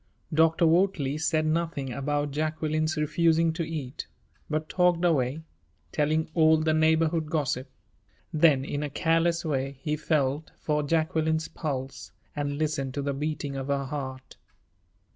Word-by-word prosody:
Dr. 160 +2 +4
Wortley 160 -4 +2
said 155 0 +1
nothing 155 -5 -1
about 145 +2 -1
Jacqueline's 155 +2 -1
refusing 165 +2 +2
to 165 - -4
eat, 155 -5 -5 0.4
but 155 0 -1
talked 180 -1 +2
away, 150 -2 +1 0.5
telling 155 +2 +1
all 160 -1 +5
the 155 0 +1
neighborhood 160 0 +2
gossip. 140 -4 -1 0.6
Then, 150 -4 +4
in 145 0 -3
a 150 - -2
careless 165 +3 +1
way, 135 -2 -2
he 150 -1 0
felt 150 -1 0
for 150 -1 0
Jacqueline's 160 +1 0
pulse 135 -3 -5 0.2
and 145 -1 -2
listened 140 -4 -2
to 140 - -2
the 140 0 -1
beating 145 0 -3
of 135 0 -4
her 140 -1 0
heart. 130 -2 -6
155 Hz, 140 wpm, -27 LUFS, 140-160 Hz, 0.6 s, all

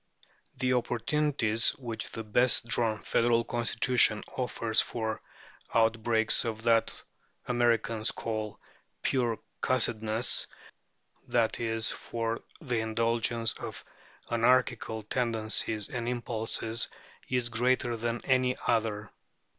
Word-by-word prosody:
The 130 -1 +1
opportunities 120 -1 +1
which 115 -5 -5
the 115 - -6
best 120 +3 +3
drawn 115 -3 +1
federal 115 0 +2
constitution 115 -1 +3
offers 115 -3 +1
for 110 -2 -4 0.5
outbreaks 115 0 +3
of 110 -1 -5
what 115 -1 +2 0.4
Americans 115 -2 +2
call 110 -2 -4 0.4
"pure 120 -4 +1 0.2
cussedness" 110 -2 +2 0.8
that 115 -2 +1
is, 115 -1 0
for 115 0 -4 0.2
the 125 -8 -2
indulgence 115 +1 0
of - - -8 0.5
anarchical 115 -2 +2
tendencies 110 -2 -1
and 120 -2 -3
impulses 115 -1 -2 0.4
is 125 -2 0
greater 120 +1 +1
than 115 +1 -3
in - - -16
any 130 0 +2
other. 110 -3 0
115 Hz, 100 wpm, -29 LUFS, 110-120 Hz, 0.8 s, best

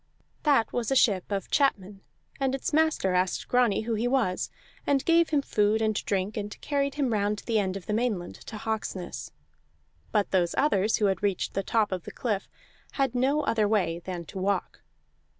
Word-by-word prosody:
That 275 -7 +3
was 240 -2 -1
a 270 - +1
ship 200 -6 +3
of 195 -2 -3
chapmen, 200 -8 +1 0.4
and 270 -1 +1
its 270 - -3
master 310 -12 +2
asked 180 0 0
Grani 245 -5 +3
who 225 +1 -2
he 225 +2 0
was, 245 -8 0 0.4
and 275 -2 +2
gave 335 0 +4
him 290 -3 +1
food 210 -1 +2
and 220 -1 +1
drink, 195 +1 -1
and 210 0 -5
carried 280 -1 -1
him 270 -5 0
round 205 0 0
the 225 -2 +2
end 190 -1 -1
of 190 - -10
the 210 - -2
Mainland 215 -6 -1
to 220 - -6
Hawksness; 200 - -4 0.8
but 205 - +1
those 175 -3 +2
others 220 -7 +2
who 210 - +1
had 190 -3 +1
reached 200 -3 -1
the 195 - 0
top 215 +1 +1
of 185 -2 -3
the - - -7
cliff 210 -5 -2 0.4
had 270 -3 0
no 265 +4 +2
other 220 -6 +1
way 190 -6 +1
than 175 -1 -6
to 190 - -7
walk. 200 +2 -1
215 Hz, 190 wpm, -27 LUFS, 195-255 Hz, 0.8 s, gave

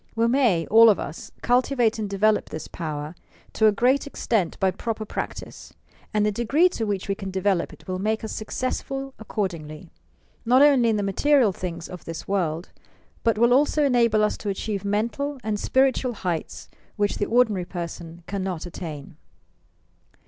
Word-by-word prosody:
We 230 +1 +2
may, 235 -10 +2
all 225 +2 +7
of 205 - +3
us, 155 - -7
cultivate 245 -2 +2
and 210 -2 -3
develop 210 +2 +2
this 155 0 -6
power 155 -2 -5 0.4
to 220 - +4
a - - +6
great 255 +7 +2
extent 220 -9 -1
by 190 -1 +2
proper 220 +2 -4
practice, - - -6 0.4
and 210 -1 +1
the 210 - +2
degree 270 - +3
to 225 -11 -3
which 200 -2 -2
we 200 - +1
can 195 -1 -6
develop 190 -1 0
it - - -16
will 185 0 -3
make 220 +3 -1
us 220 - -4
success 255 +4 -3
ful 270 0 -6
accordingly, 170 -7 -5 0.5
not 255 +4 +5
only 270 -5 +5
in 220 - +1
the 205 - -1
material 245 +4 +3
things 170 -2 -5
of 180 -2 -10
this 165 -1 -7
world, 175 -4 -1 0.5
but 230 -2 +2
will 235 +2 +4
also 295 +3 +3
enable 235 -5 +3
us 210 - +1
to 205 - -4
achieve 200 0 -3
mental 230 +8 -1
and 215 -1 -2
spiritual 260 0 +2
heights 175 -6 -4 0.3
which 205 -1 0
the 205 - 0
ordinary 220 -6 +2
person 170 -1 -7
cannot 190 -4 -3
attain. 160 -3 -8
210 Hz, 170 wpm, -24 LUFS, 185-235 Hz, 0.5 s, all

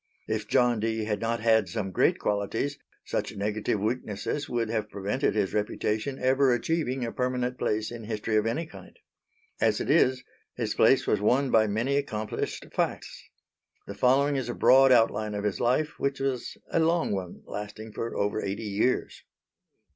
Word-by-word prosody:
If - - -2
John 120 -2 +3
Dee 110 0 -1
had 105 -2 -1
not 115 0 -1
had 110 -3 +3
some 105 -4 -3
great - - +2
qualities, 105 +7 -2 0.3
such - - -3
negative 105 +1 -1
weaknesses 110 +5 -3
would 120 -2 -1
have 110 -1 -2
prevented 105 +8 -1
his 100 -3 0
reputation 110 +4 -1
ever 130 +1 +3
achieving 130 -1 -1
a 115 - -4
permanent 125 0 -2
place 110 +1 -1
in 115 -2 -7
history 110 0 -2
of 105 +1 +2
any 150 +9 -1
kind. 160 - -14 0.6
As - - +2
it - - -1
is 130 -1 +3 0.3
his - - -2
place - - +4
was 105 - +1
won 130 +5 +2
by 110 -1 +4
many 115 +7 0
accomplished 110 -6 -3
facts. - - -3 0.6
The 100 - -7
following 135 +6 +3
is 125 -3 -3
a 120 - -3
broad 135 +1 +6
outline 110 -3 +3
of 100 - -3
his 105 -3 -1
life, 130 +6 0
which 140 0 -1
was 135 -3 -2
a - - +2
long 165 +1 +2
one 95 -3 -5
lasting 105 +1 -7
for 115 - -4
over 105 +1 0
eighty 100 +3 -3
years. 105 +4 -1
115 Hz, 170 wpm, -27 LUFS, 105-130 Hz, 0.6 s, broad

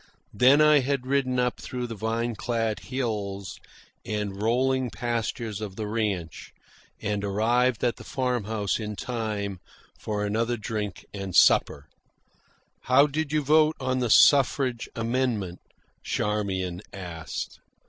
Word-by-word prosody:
Then 130 +8 +6
I 150 -1 +6
had 135 -1 -1
ridden 130 -1 +1
up 125 0 0
through 125 -1 -4
the 115 - -5
vine 115 +2 -2
clad 115 -1 -1
hills 105 -7 -4 0.4
and 105 -2 -3
rolling 130 +3 +1
pastures 115 -2 -3
of 100 -3 -5
the 110 - -4
ranch, 105 -7 -3 0.5
and 105 -1 -2
arrived 115 +4 +1
at 120 -1 +1
the - - -10
farm 125 -4 -1
house 105 -1 -1
in 105 -1 -4
time 105 -5 -3 0.4
for 105 -1 -2
another 115 +3 0
drink 105 -3 -4
and 100 -3 -5
supper. 70 +1 +4 1.0
"How 130 +3 +6
did 150 +1 -2
you 155 -1 +1
vote 155 +2 +4
on 130 -1 -1
the 120 -2 0
suffrage 130 -1 +4
amendment?" 115 -6 -1 0.4
Charmian 95 -4 -2
asked. 85 -4 -6
115 Hz, 130 wpm, -26 LUFS, 105-125 Hz, 1.0 s, Then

